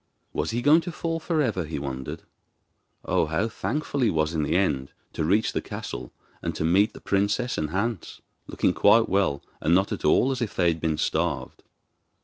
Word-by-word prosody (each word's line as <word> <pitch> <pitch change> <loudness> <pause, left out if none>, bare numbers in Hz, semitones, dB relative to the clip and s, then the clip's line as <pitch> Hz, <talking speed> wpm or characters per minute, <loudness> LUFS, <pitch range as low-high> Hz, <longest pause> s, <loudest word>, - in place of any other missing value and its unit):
Was 75 - -1
he 120 +1 -2
going 155 +3 +6
to 175 - -5
fall 165 0 -3
for 160 -1 0
ever, 105 -8 -1
he 75 +1 -5
wondered! 65 -2 -5 0.8
Oh, - - +1
how 80 +8 0
thankful 145 +5 -3
he 120 -4 +3
was 80 -2 0
in 80 - 0
the 75 +2 0
end 70 -8 0 0.2
to - - -2
reach 100 +7 +2
the - - -1
castle, - - -6 0.3
and - - -3
to - - -2
meet 95 +6 +3
the - - -11
princess 100 +5 0
and 75 -1 -2
Hans, 100 +2 -3 0.3
looking - - +1
quite 110 +3 +5
well 95 -8 +1 0.2
and 80 +3 +3
not 95 +2 +2
at - - -4
all 135 - +4
as 130 -1 -3
if 115 - -3
they 90 -2 +3
had 80 -1 -2
been 80 -2 0
starved. - - -1
95 Hz, 200 wpm, -26 LUFS, 80-120 Hz, 0.8 s, going